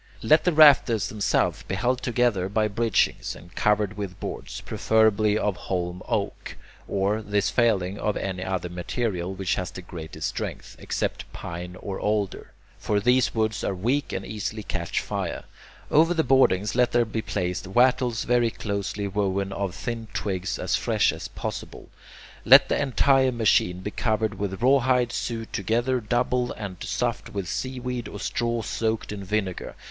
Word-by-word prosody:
Let 155 +8 +4
the 180 - +4
rafters 140 - +6
themselves 105 -1 0
be 95 - -4
held 125 +5 0
together 120 -7 +1
by 110 +1 +1
bridgings, 115 +1 0
and 85 +1 -14
covered 105 -1 +1
with 100 -3 -5
boards, - - -6
preferably 110 -1 +2
of 105 -3 0
holm 90 0 -3
oak, - - -3 0.3
or, 100 +2 0
this 105 -1 0
failing, 100 -5 +1
of 105 - -1
any 95 -1 -3
other 95 -2 -2
material 90 +1 -3
which 95 0 -1
has 90 - -2
the 90 - -9
greatest 80 -3 -5
strength, - - -6
except - - -3
pine 90 +1 -7
or 100 -2 -5
alder. 105 -2 -1 0.3
For 105 -1 0
these 125 +4 +2
woods 110 -1 0
are 95 - -1
weak 125 +10 0
and 95 - -4
easily 110 +1 -4
catch 85 -3 -2
fire. - - -4 0.5
Over 165 +3 +4
the 160 - +2
boardings 105 -8 +3
let 125 0 +2
there 120 -1 +4
be 110 0 -3
placed 90 -3 -3
wattles 120 +2 +2
very 120 -1 +2
closely 100 -1 -3
woven 100 -1 -1
of 100 -2 -3
thin 115 0 -4
twigs 95 -2 -2
as - - 0
fresh - - +2
as - - -6
possible. - - -6 0.5
Let - - +8
the - - +1
entire 135 -1 +3
machine 105 -6 +2
be 105 - -4
covered 110 -3 -1
with 100 +1 -3
rawhide 125 -2 +3
sewed 115 -1 -4
together 120 +6 0
double 125 +2 0
and 100 -4 -7
stuffed - - -2
with 100 -3 -4
seaweed 125 +2 -3
or 105 - -8
straw 120 +1 -1
soaked 110 0 -2
in 100 -1 -6
vinegar. 95 -2 -3
105 Hz, 160 wpm, -25 LUFS, 95-120 Hz, 0.5 s, Let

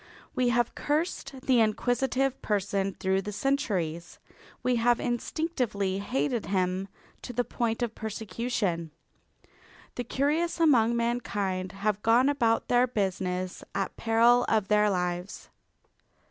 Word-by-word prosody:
We 250 -1 +2
have 240 0 +1
cursed 295 -3 -2
the 260 -3 +3
inquisitive 255 +4 +1
person 200 -2 -1
through 190 0 0
the 210 - -5
centuries. 195 - -1 0.5
We 250 -1 +2
have 240 +1 +3
instinctively 240 - -1
hated 240 +2 -1
him 185 0 0 0.3
to 245 - -7
the 245 +1 +1
point 235 0 -2
of 230 -2 -2
persecution. 215 -5 -3 1.0
The 245 - -3
curious 300 +8 0
among 240 -8 +4
mankind 205 -6 -1
have 205 +1 -1
gone 240 +5 +4
about 230 -6 +1
their 245 +1 +4
business 185 -4 -2
at 195 - -2
peril 235 +2 +4
of 215 -3 +1
their 210 0 +4
lives. 180 0 -3
225 Hz, 120 wpm, -28 LUFS, 195-245 Hz, 1.0 s, among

